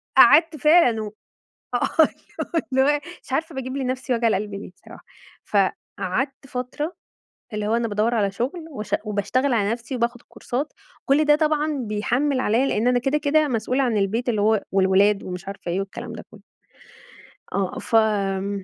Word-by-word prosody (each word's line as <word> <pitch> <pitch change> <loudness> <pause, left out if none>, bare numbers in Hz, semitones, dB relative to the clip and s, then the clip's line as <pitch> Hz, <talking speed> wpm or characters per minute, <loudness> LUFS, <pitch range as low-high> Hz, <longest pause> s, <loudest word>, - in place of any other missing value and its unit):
فقعدت 305 +6 +7
فعلًا 300 -7 +4
و - - -5 0.7
آه. - - +1 0.8
اللي 265 0 +4
هو - - +3
اللي 295 - +4
هو 290 - -1 0.2
مش - - -11
عارفة 320 +2 -1
باجيب 260 0 -4
لنفسي 260 -1 -1
وجع 230 0 +2
القلب 205 0 -1
ليه 200 -2 -7
صراحة؟ - - -15 0.4
فقعدت 205 +6 -1
فترة 255 +7 -4 0.6
اللي 210 0 -2
هو 225 +2 +2
أنا 235 -1 0
بادوّر 215 +3 +1
على 200 -3 +1
شغل 265 - -3
وشأ 215 -6 -2
وباشتغل 245 +6 0
على 205 -2 +1
نفسي 240 +2 -5
وباخد 240 0 -1
كورسات، 275 +5 -5 0.3
كل 290 +3 +4
ده 295 0 +5
طبعًا 305 -1 +1
بيحمِّل 250 +6 0
عليّا 245 +4 +2
لإن 235 -1 +1
أنا 250 0 +3
كده، 275 +4 0
كده 300 +1 +2
مسؤولة 250 +3 0
عن 235 -3 0
البيت 220 +5 0
اللي 215 -3 +1
هو 215 0 +3
والولاد 195 +1 +3
ومش 180 +1 -7
عارفة 195 -3 -6
إيه 185 +3 0
والكلام 225 +4 -6
ده 220 - -8
كُلّه. 215 - -15 1.1
آه. 195 -2 -1
فم 200 -3 +1
235 Hz, 170 wpm, -23 LUFS, 205-275 Hz, 1.1 s, فقعدت